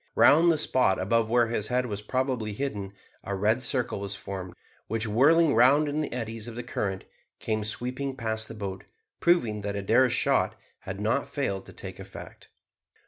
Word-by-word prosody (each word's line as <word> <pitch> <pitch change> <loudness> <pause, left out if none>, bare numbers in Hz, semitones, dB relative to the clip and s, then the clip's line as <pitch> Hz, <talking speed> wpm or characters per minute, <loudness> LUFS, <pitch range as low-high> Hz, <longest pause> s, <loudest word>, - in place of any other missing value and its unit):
Round 165 +4 +6
the 160 - +1
spot 125 -9 +2
above 110 +4 +1
where 120 0 +4
his 110 -2 -2
head 125 +2 +1
was 105 -4 -4
probably 125 -2 -1
hidden, 100 -5 -4 0.3
a 100 - -3
red 105 +6 +2
circle 125 -5 0
was 100 0 -4
formed, 95 -3 -7 0.3
which, 115 +1 -1
whirling 145 +9 +4
round 135 +6 +5
in 145 +2 -1
the 150 - -3
eddies 115 -2 -4
of 115 - -7
the 120 - -5
current, 100 -5 -3 0.3
came 110 -1 -2
sweeping 130 +5 -3
past 110 -2 -2
the - - -9
boat, 100 -3 -5 0.4
proving 120 -12 +2
that 100 0 -3
Adair's 115 +6 +3
shot - - +2 0.2
had 95 0 -7
not 110 +7 0
failed 100 -10 -2
to - - -11
take - - -8
effect. - - -11
115 Hz, 180 wpm, -27 LUFS, 105-130 Hz, 0.4 s, Round